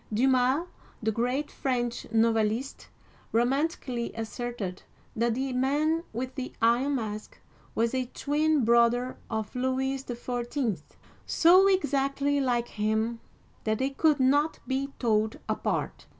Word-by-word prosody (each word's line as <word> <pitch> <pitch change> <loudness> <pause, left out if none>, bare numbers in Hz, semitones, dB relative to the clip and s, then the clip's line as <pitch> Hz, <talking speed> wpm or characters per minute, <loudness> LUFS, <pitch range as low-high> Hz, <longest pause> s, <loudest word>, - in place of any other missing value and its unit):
Dumas - - -2
(dii 265 +3 +4
ma'), 260 +6 +2 0.4
the 220 - +2
great 250 +6 -1
French 240 -3 -2
novelist, 225 +2 +1 0.4
romantically 250 0 0
asserted 225 -4 -4 0.3
that 230 0 +1
the 265 +1 -2
Man 295 +6 +1
with 250 +3 -4
the 260 -2 -5
Iron 250 +4 +3
Mask 215 -3 -5 0.4
was 230 +2 +1
a 255 -1 -1
twin 300 -2 +1
brother 235 +2 +3
of 220 0 -3
Louis 260 +1 -1
XIV., 240 - -3 0.5
so 365 +3 +6
exactly 285 -5 +1
like 240 -2 0
him 220 +2 -1 0.4
that 220 0 0
they 265 +3 0
could 300 +1 +2
not 290 +4 +3
be 275 +1 -2
told 220 -2 +1
apart. - - -2
250 Hz, 125 wpm, -28 LUFS, 230-275 Hz, 0.5 s, so